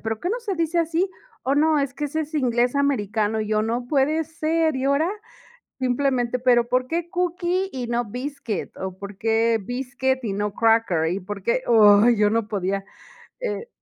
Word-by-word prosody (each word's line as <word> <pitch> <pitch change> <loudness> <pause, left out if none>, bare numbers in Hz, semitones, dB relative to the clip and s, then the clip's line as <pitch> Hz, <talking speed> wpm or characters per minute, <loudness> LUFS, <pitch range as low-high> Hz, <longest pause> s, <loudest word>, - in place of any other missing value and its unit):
"Pero 220 -1 -3
¿qué 355 - -2
no 455 +6 -1
se 420 -5 -3
dice 335 0 0
así?". 335 +3 +1 0.3
"Oh, 270 - +1
no, 310 +1 +3
es 275 -1 -2
que 295 - -4
ese 305 +2 -2
es 310 +1 -6
inglés 245 -2 +1
americano". 220 -6 0
Y 215 - -3
yo: 215 0 +1
"No 235 +2 -2
puede 295 +3 +2
ser". 320 -1 0
Y 260 - -2
ahora 280 +5 +2 0.7
simplemente, 250 -1 0
pero: 245 -1 +3
"¿Por 255 +1 +1
qué 340 +4 -3
cookie, 360 +1 -1
y 250 -2 -4
no 240 0 0
biscuit?". 245 -2 -5
O: 190 -1 -5
"¿Por 200 0 -9
qué 225 +1 +2
biscuit 260 +3 -2
y 210 - -2
no 205 +1 -2
cracker? 225 -9 +2
¿Y 190 - -3
por 200 +1 -7
qué?". 235 +5 +1 0.4
Ay, 240 +1 +5
yo 210 0 +3
no 225 -1 0
podía, 195 -1 -2 0.6
eh - - -4
250 Hz, 190 wpm, -23 LUFS, 220-310 Hz, 0.7 s, Ay